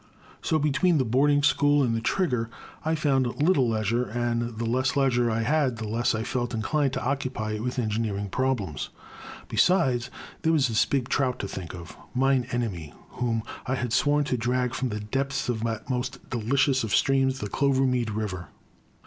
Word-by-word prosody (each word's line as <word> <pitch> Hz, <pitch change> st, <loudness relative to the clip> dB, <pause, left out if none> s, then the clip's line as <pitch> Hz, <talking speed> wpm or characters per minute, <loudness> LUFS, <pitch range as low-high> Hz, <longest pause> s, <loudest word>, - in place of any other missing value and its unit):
So 160 Hz, -, +1 dB
between 155 Hz, +4 st, +2 dB
the 130 Hz, -, +2 dB
boarding 145 Hz, +5 st, +3 dB
school 145 Hz, 0 st, +4 dB
and 120 Hz, -3 st, +1 dB
the 115 Hz, -, -1 dB
Trig 185 Hz, +7 st, 0 dB
ger 115 Hz, -2 st, -1 dB, 0.3 s
I 160 Hz, +1 st, +1 dB
found 135 Hz, -5 st, 0 dB
little 145 Hz, -6 st, +3 dB
leisure, 115 Hz, +2 st, 0 dB
and 120 Hz, 0 st, -2 dB
the 115 Hz, -, -2 dB
less 130 Hz, +4 st, +1 dB
leisure 125 Hz, -4 st, +2 dB
I 115 Hz, 0 st, 0 dB
had 135 Hz, -2 st, +1 dB
the 110 Hz, -1 st, -5 dB
less 115 Hz, +2 st, +1 dB
I 110 Hz, -, -2 dB
felt 120 Hz, 0 st, -2 dB
inclined 135 Hz, +5 st, 0 dB
to -, -, -3 dB
occupy 130 Hz, -5 st, -2 dB
it 105 Hz, 0 st, -3 dB
with 125 Hz, +1 st, -3 dB
engi 110 Hz, -3 st, 0 dB
neering 100 Hz, -1 st, -4 dB
problems. 120 Hz, -, -1 dB, 0.6 s
Besides, 130 Hz, -, +2 dB, 0.3 s
there 160 Hz, 0 st, +2 dB
was 140 Hz, -6 st, +3 dB
the 110 Hz, -2 st, +2 dB
big 135 Hz, -3 st, 0 dB
trout 130 Hz, -3 st, 0 dB
to -, -, -4 dB
think 90 Hz, -3 st, -7 dB
of. 85 Hz, -2 st, -10 dB, 0.2 s
Mine 130 Hz, -1 st, +2 dB
Enemy, 100 Hz, -11 st, -3 dB
whom 115 Hz, -3 st, -2 dB, 0.2 s
I 130 Hz, -, +1 dB
had 120 Hz, -2 st, -2 dB
sworn 145 Hz, +2 st, +3 dB
to 130 Hz, -3 st, -1 dB
drag 125 Hz, +1 st, 0 dB
from 130 Hz, -, -1 dB
the 105 Hz, -1 st, -3 dB
depths 135 Hz, +5 st, -2 dB
of 115 Hz, -2 st, -1 dB
that 110 Hz, -1 st, -3 dB
most 130 Hz, +1 st, -2 dB
deli 120 Hz, +2 st, -1 dB
cious 135 Hz, -2 st, +3 dB
of 110 Hz, -, +1 dB
streams, 135 Hz, -1 st, +2 dB
the 105 Hz, -, -4 dB
Clovermead 130 Hz, -1 st, +1 dB
River. 100 Hz, -4 st, -4 dB
125 Hz, 190 wpm, -26 LUFS, 115-135 Hz, 0.6 s, school